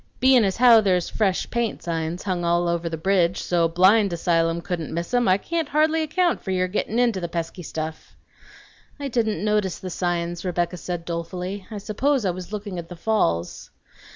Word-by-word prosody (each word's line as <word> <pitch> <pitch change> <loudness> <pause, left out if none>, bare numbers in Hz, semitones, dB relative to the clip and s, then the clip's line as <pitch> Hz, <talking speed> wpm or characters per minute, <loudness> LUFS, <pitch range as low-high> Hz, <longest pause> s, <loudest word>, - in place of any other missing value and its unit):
"Bein' 260 -2 +5
as 190 -2 0
how 235 -2 +7
there's 185 -4 +1
'Fresh 195 -4 0
Paint' 235 -3 -2
signs 165 +1 -3
hung 185 -3 -2
all 170 +1 +2
over 170 0 -1
the 165 - -4
breedge, 180 0 +2
so 170 -2 +1
't - - -8
a - - -22
blind 195 +3 +5
asylum 165 0 +1
couldn't 170 -2 -4
miss 170 +7 -4
'em, 245 -2 +3
I 185 0 +5
can't 325 - -3
hardly 310 +2 +2
account 340 +3 +1
for - - -7
your 185 -1 +1
gettin' 210 +4 -2
int' 235 -6 +2
the 170 - -2
pesky 170 +1 -4
stuff." 160 -1 -6 0.8
"I 285 - -3
didn't 220 -6 0
notice 210 -4 +1
the 185 - -7
signs," 175 -1 -2
Rebecca 175 -1 -1
said 175 -1 -5
dolefully. 180 +3 -5
"I 215 - -6
suppose 230 +5 0
I 185 - +2
was 180 +2 -8
looking 205 -3 -5
at 170 - -9
the 180 - -8
falls." 165 - -1
185 Hz, 200 wpm, -23 LUFS, 170-215 Hz, 0.8 s, how